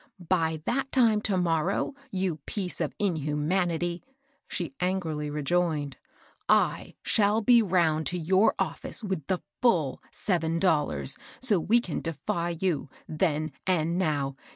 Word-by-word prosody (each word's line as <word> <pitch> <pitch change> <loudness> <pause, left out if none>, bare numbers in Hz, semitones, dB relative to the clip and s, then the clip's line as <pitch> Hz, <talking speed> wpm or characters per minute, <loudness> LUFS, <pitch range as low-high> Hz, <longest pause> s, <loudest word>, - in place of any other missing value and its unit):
" - - -46 0.2
By 160 -1 -1
that 270 +2 -1
time 225 -5 +4
to 200 -3 +1
morrow, 175 - 0 0.2
you 185 -7 -1
piece 185 -4 -3
of 155 -4 -2
inha 155 -7 -1
manity," 175 +2 0 0.5
she - - -3
angrily 165 -5 -1
rejoined, 150 -1 0 0.3
" - - -32 0.2
I - - +2
shall 210 0 +3
be 240 +1 +6
round 170 -6 +2
to 180 - -1
your 190 +6 +3
oflS^ce - - -3
with 190 -8 -3
the 185 -2 -1 0.2
ftill 165 - +2
seven 165 -4 0
dollars, 150 -6 +1 0.2
so 220 -8 +3
we 225 +8 +3
can 180 -9 -4
defy 170 +2 -2
you 170 -7 -1
— - - -27
then 155 -1 0 0.2
and 170 -1 +1
now. 145 -6 0
175 Hz, 150 wpm, -28 LUFS, 155-190 Hz, 0.5 s, be